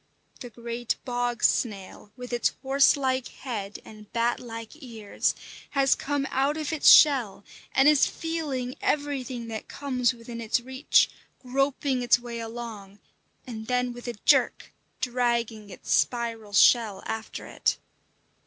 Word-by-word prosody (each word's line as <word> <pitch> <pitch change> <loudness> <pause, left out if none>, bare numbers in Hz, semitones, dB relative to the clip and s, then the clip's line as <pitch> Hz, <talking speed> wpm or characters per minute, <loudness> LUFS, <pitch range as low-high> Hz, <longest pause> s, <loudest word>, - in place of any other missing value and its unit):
The 245 - -8
great 235 0 -4
bog 245 -1 -2
snail, 205 -2 -1
with 250 0 -8
its 240 - +1
horse 270 +2 +4
like 260 -2 -1
head 210 -6 -6
and 215 -1 -14
bat 235 0 0
like 230 +5 -9
ears, 225 -6 -2 0.4
has 270 -1 +5
come 285 -1 -2
out 275 +3 +1
of 310 0 -3
its 310 - +5
shell 255 -10 +6 0.3
and 270 +2 +4
is 300 -2 +5
feeling 295 -7 -3
everything 265 -5 -2
that 220 -1 -6
comes 255 -4 0
within 235 -1 -9
its 225 +2 +1
reach, 260 +3 +2 0.3
groping 270 0 -1
its 245 - +4
way 240 -1 -7
along, 225 -4 -8 0.5
and 220 -4 -7
then 250 0 0
with 245 +1 -10
a 240 - -3
jerk - - +2 0.3
dragging 235 -4 -1
its 185 - -8
spiral 230 -4 0
shell 210 -2 +4
after 225 0 -5
it. - - -1
245 Hz, 140 wpm, -26 LUFS, 230-265 Hz, 0.5 s, shell